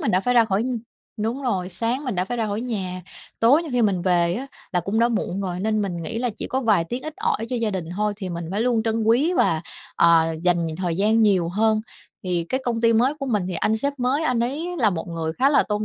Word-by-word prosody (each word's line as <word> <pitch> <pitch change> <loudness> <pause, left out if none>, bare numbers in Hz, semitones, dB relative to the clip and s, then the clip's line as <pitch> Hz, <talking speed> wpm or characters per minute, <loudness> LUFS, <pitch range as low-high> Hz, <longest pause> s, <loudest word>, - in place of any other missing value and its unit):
mình 215 - 0
đã 185 - +3
phải 245 +4 0
ra 235 - +6
khỏi 205 0 0
nh 250 -2 -2 0.4
đúng 235 +6 -2
rồi, 190 -8 -1
sáng 230 +9 -2
mình 250 -6 -2
đã 180 +1 0
phải 245 +5 -4
ra 225 -2 0
khỏi 205 +2 -2
nhà, 190 -7 -4 0.4
tối 275 +9 +5
nhiều 315 - -7
khi 245 - +2
mình 195 -5 +1
về 175 -1 +2
á 265 +5 -4 0.3
là 180 - +2
cũng 200 +6 -2
đã 235 +1 +4
muộn 200 -4 -2
rồi, 180 -2 -3
nên 215 0 0
mình 175 -4 -3
nghĩ 225 - -3
là 245 -1 0
chỉ - - -4
có 265 - -1
vài 210 -8 +3
tiếng 245 +8 -5
ít 310 0 -6
ỏi 440 - -1
cho 250 - -2
gia 225 -2 0
đình 185 -4 -3
thôi, 210 0 0
thì 190 -3 -5
mình 170 -1 -4
phải 200 +3 -1
luôn 235 -2 +2
trân 225 0 0
quý 245 +10 +3
và, 160 0 +2 0.3
ờ, 165 -1 +4
dành 175 -2 +2
thời 175 -3 -2
gian 215 +3 +3
nhiều 190 -6 +3
hơn. 215 +3 +2 0.4
Thì 180 -2 -1
cái 260 - 0
công 230 -2 -1
ty 230 0 +4
mới 250 +6 +3
của 275 -2 -5
mình 210 -6 +1
thì 180 - -3
anh 220 +6 +1
sếp 280 +5 -1
mới 260 +5 +1
anh 250 -5 +1
ấy 315 +9 -2
là 220 -5 +3
một 170 0 -4
người 165 -1 -3
khá 265 +11 +2
là 280 -2 +5
tôn 210 +1 -1
220 Hz, 275 wpm, -23 LUFS, 180-245 Hz, 0.4 s, ra